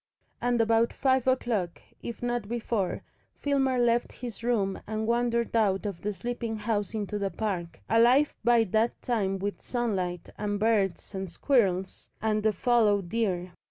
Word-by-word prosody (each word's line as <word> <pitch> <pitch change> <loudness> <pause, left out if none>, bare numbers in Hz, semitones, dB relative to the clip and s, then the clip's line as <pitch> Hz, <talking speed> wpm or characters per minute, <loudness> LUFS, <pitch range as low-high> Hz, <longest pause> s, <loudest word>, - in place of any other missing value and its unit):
And 245 -1 +1
about 225 +1 +3
five 260 -1 +1
o'clock, 225 -9 0 0.2
if 235 0 -7
not 240 -3 -1
before, 225 -4 -2 0.3
Filmer 270 -2 +1
left 240 0 +2
his 235 -3 -7
room 210 -5 0
and 220 +1 -2
wandered 235 0 +1
out 205 -3 +2
of 200 -4 -4
the 210 - -1
sleeping 235 +1 -4
house 210 -1 -2
into 210 -1 -2
the 200 -1 0
park, 180 -3 -3
alive 245 +6 +4
by 235 0 +5
that 220 +3 0
time 200 -6 0
with 200 +1 -4
sunlight 190 -8 -2
and 205 -1 -1
birds 210 -3 +1
and 190 -1 -4
squirrels 190 - 0
and 215 0 +1
the 220 +1 +3
fallow 220 -2 +3
deer. 180 -2 -1
220 Hz, 155 wpm, -28 LUFS, 200-240 Hz, 0.3 s, by